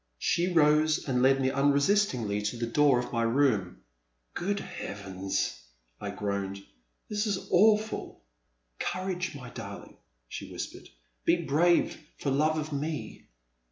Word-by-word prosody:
She 175 - +1
rose 155 -1 +3
and 125 -2 +1
led 135 +1 +5
me 130 0 +1
unresistingly 140 - +2
to 105 +3 -2
the 115 - -1
door 140 +2 +4
of 125 - -3
my 115 - +1
room. 115 - +1 0.5
Good 200 +3 -1
Heavens! 95 - -4 0.4
I 100 - -4
groaned, 100 -1 -3 0.4
this 210 +1 -1
is 200 -3 -2
awful.* 215 - +2 0.6
Courage, 185 -2 -2
my 125 -3 -9
darling! - - -9 0.3
she - - -7
whispered, - - -7 0.3
be - - +4
brave 170 +4 +2 0.2
for 140 - -2
love 155 +3 +2
of 155 -1 -3
me. 145 -5 -4
140 Hz, 130 wpm, -29 LUFS, 110-170 Hz, 0.6 s, led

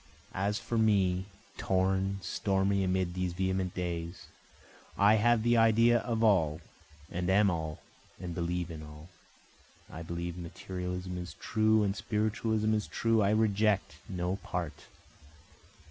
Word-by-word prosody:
As 100 +2 0
for 115 +1 -2
me, 95 -4 +2 0.3
(torn, 95 +1 +1
stormy, 95 +1 0
amid 90 -1 0
these 90 -1 -2
vehement 95 0 -1
days,) 85 -1 -4 0.7
I 105 +2 +5
have 120 +1 +3
the 120 0 +3
idea 115 +1 +5
of 115 -1 -2
all, 80 -8 +3 0.5
and 90 +1 -2
am 100 +1 +4
all 80 -2 -4 0.4
and 90 -2 -5
believe 85 0 -2
in 80 -2 -7
all, 75 +2 -11 0.8
I 80 - -7
believe 85 +1 -5
materialism 90 +1 -5
is 90 0 -7
true 110 0 +2
and 100 -1 0
spiritualism 110 0 0
is 105 -1 -1
true, 115 -1 +1
I 100 - +3
reject 105 -1 +1
no 90 0 -2
part. 85 -5 -5
95 Hz, 130 wpm, -31 LUFS, 90-105 Hz, 0.8 s, I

